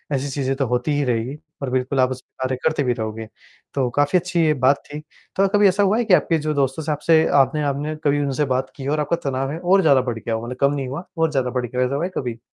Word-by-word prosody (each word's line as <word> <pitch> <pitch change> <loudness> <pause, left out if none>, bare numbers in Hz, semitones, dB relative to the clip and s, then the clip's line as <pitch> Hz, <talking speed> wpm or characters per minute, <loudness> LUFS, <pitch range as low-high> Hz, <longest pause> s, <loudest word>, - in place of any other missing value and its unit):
ऐसी 135 +1 -2
चीज़ें 135 -1 -1
तो 135 0 0
होती 125 +5 0
ही 145 - +1
रहेगी 125 +3 -1 0.2
और 135 - -2
बिल्कुल 130 +1 -1
आप 130 0 +3
उस 130 0 -5
पर - - -61
कार्य 130 0 0
करते 155 -2 +1
भी 125 -2 +1
रहोगे। 110 -1 -5 0.5
तो 130 -3 0
काफ़ी 145 +4 +3
अच्छी 180 0 -2
ये 155 - +3
बात 140 +2 +4
थी, 145 +1 -7 0.4
तो 195 +1 +3
कभी 205 +1 +4
ऐसा 195 +2 +2
हुआ 200 +2 +3
है 240 - 0
कि 205 - +3
आपके 165 -2 +3
जो 155 - +1
दोस्त 140 +1 0
से 155 - -1
आपसे 160 +2 +3 0.2
आपने 140 +3 0
आपने 145 +2 -2
कभी 145 0 +2
उनसे 140 +2 0
बात 130 +1 -2
की 135 - -8
हो 145 +2 +1
आपका 150 +2 0
तनाव 135 +1 -2
है 160 - -5
और 185 +3 +3
ज़्यादा 140 -6 +4
बढ़ 120 -3 -3
गया 115 - -4
हो 110 - -4
मतलब 125 +1 -6
कम 140 +1 +4
नहीं 140 -2 -3
हुआ 140 +7 -5
और 160 -1 +2
ज़्यादा 130 -3 0
बढ़ 125 0 -2
गया 125 +1 -5
है - - +3
ऐसा 135 - -3
हुआ 145 - -1
है 185 - -5
कभी? 120 -3 -3
140 Hz, 285 wpm, -21 LUFS, 130-155 Hz, 0.5 s, बात